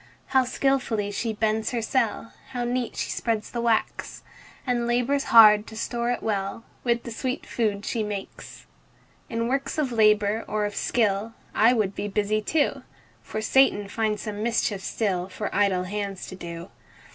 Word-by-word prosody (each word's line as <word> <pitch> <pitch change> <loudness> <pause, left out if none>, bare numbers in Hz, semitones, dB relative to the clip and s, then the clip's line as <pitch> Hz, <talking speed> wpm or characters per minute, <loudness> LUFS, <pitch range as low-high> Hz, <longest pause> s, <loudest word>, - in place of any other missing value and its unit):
How 265 -1 +4
skilfully 255 -5 0
she 225 +3 -2
builds 220 0 0
her 240 -2 -2
cell! 230 -1 -1 0.2
How 245 -1 -2
neat 245 0 -2
she - - -2
spreads 225 -2 -2
the 235 - -2
wax! 230 -2 -1 0.4
And 240 -2 0
labors 245 +4 +1
hard 215 -2 +7
to 220 - -9
store 235 +1 -2
it 245 - -1
well 200 0 -2 0.2
With 235 -1 +1
the 235 - -7
sweet 255 +4 -3
food 210 -3 -1
she 230 - -1
makes. 205 -2 -6 0.6
In 230 -2 -1
works 270 +4 -1
of 290 -5 0
labor 215 -1 +3
or 210 -1 0
of 205 - -4
skill, 220 -1 0 0.2
I 230 +3 +5
would 210 -5 0
be 200 +1 -3
busy 210 +1 0
too; 295 +7 0 0.4
For 215 - -5
Satan 220 -4 +3
finds 215 0 -1
some 210 -1 -5
mischief 225 -3 0
still 190 -4 -1
For 205 +2 -5
idle 195 -3 +2
hands 200 0 -4
to 185 - -8
do. 170 0 -8
220 Hz, 170 wpm, -25 LUFS, 205-240 Hz, 0.6 s, hard